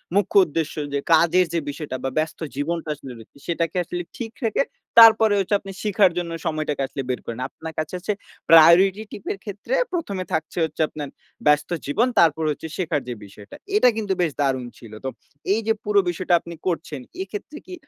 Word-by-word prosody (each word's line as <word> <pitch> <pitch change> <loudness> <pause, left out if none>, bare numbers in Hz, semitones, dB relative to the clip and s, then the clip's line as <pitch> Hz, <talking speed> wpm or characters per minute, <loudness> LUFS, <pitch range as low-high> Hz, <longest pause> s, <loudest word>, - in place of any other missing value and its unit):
মুখ্য 200 0 +1
উদ্দেশ্য 160 0 -2 0.2
যে 140 - +1
কাজের 170 +3 +5
যে 170 - +2
বিষয়টা 145 -2 -5
বা, 135 - 0
ব্যস্ত 155 0 -1 0.2
জীবনটা 160 +3 -2
আসলে 135 -2 -10
রয়েছে, 115 +5 -16
সেটাকে 165 -1 -1
আসলে 175 +1 -4 0.2
ঠিক 225 -2 -5
রেখে, 225 - +2 0.4
তারপরে 220 -2 +8
হচ্ছে 195 +1 +1
আপনি 195 - -9
শিখার 205 -3 +4
জন্য 175 -1 -2
সময়টাকে 155 -2 -1
আসলে 135 - -5
বের 125 - -1
করেন। 115 +1 -6
আপনার 160 0 -9
কাছে 155 +1 -4
হচ্ছে 200 +4 -2 0.4
priority 170 +5 +7
tip 200 - -9
এর - - -10
ক্ষেত্রে 205 - -5 0.2
১ম 330 - -2
এ - - -17
থাকছে 160 +2 -2
হচ্ছে 160 0 -5
আপনার 145 -2 -6 0.4
ব্যস্ত 150 0 +3 0.2
জীবন, 215 - +2
তারপর 160 -1 +4
হচ্ছে 150 - -6
শেখার 160 -5 -1
যে 125 - -3
বিষয়টা। 100 +1 -13 0.2
এটা 335 -12 +6
কিন্তু 205 -3 -1
বেশ 165 - +1
দারুণ 130 -3 0
ছিল। 115 -3 -13
তো 130 - 0 0.4
এইযে 225 +1 +1
পুরো 205 -1 +3
বিষয়টা 175 +1 -1
আপনি 170 0 -9
করছেন, 160 -5 -2 0.2
এক্ষেত্রে 205 +10 -7
কি 365 - -10
170 Hz, 190 wpm, -23 LUFS, 150-200 Hz, 0.4 s, তারপরে